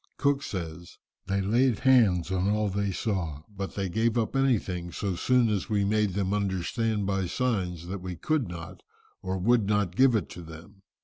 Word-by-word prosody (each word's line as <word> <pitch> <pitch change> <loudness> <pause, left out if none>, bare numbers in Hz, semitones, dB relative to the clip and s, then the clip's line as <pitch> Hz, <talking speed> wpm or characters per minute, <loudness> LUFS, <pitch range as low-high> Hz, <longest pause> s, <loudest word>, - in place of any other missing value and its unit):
Cook 140 -1 +2
says, 85 - -6 0.3
"They 100 0 0
laid 115 +4 +2
hands 110 -10 +4
on 95 +1 +1
all 105 0 +1
they 100 0 -1
saw, 85 -8 -2
but 100 -2 -6
they 100 -1 -1
gave 110 +5 +1
up 115 +3 -1
anything 100 -10 0
so 95 +1 -2
soon 125 +6 +3
as 105 -2 -1
we 100 -2 +1
made 105 -2 +1
them 100 -1 0
understand 105 +2 -1
by 95 -1 0
signs 90 -7 -1
that 95 +2 -5
we 90 -1 -5
could 155 - 0
not, 85 -2 -8 0.4
or 95 0 -2
would 110 +2 +2
not 105 -4 +1
give 130 0 +5
it 100 -7 0
to 90 - -9
them. 85 +5 -12
100 Hz, 185 wpm, -28 LUFS, 90-110 Hz, 0.4 s, give